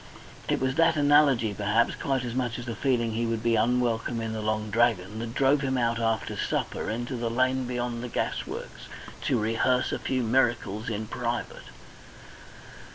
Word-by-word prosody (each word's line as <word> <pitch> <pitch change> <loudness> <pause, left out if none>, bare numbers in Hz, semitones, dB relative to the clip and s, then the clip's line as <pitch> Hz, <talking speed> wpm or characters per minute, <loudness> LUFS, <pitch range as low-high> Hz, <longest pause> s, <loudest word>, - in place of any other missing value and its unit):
It - - +1
was 130 0 0
that 165 0 +4
analogy, 145 -7 +4
perhaps, 105 +3 +1
quite 135 -2 -1
as 120 - -4
much 125 -2 -1
as 120 - -6
the 115 -2 -4
feeling 120 -2 +1
that - - -5
he 115 0 0
would 115 0 -2
be 115 -1 +3
unwelcome 120 0 +1
in 115 -1 -3
the 110 - -3
Long 110 0 -2
Dragon, 110 -3 +1
that 115 +1 -5
drove 140 +1 +3
him 130 -2 0
out 115 -1 +1
after 115 -1 -1
supper - - -2
into 120 +4 -3
the 120 -1 -2
lane 130 +2 +1
beyond 120 -1 -3
the 125 - -5
gasworks, - - -4 0.4
to - - +2
rehearse 115 +4 +1
a - - -2
few 130 -2 -1
miracles 115 -3 +1
in 110 -1 -3
private. 120 +2 -4
120 Hz, 180 wpm, -27 LUFS, 115-130 Hz, 0.4 s, that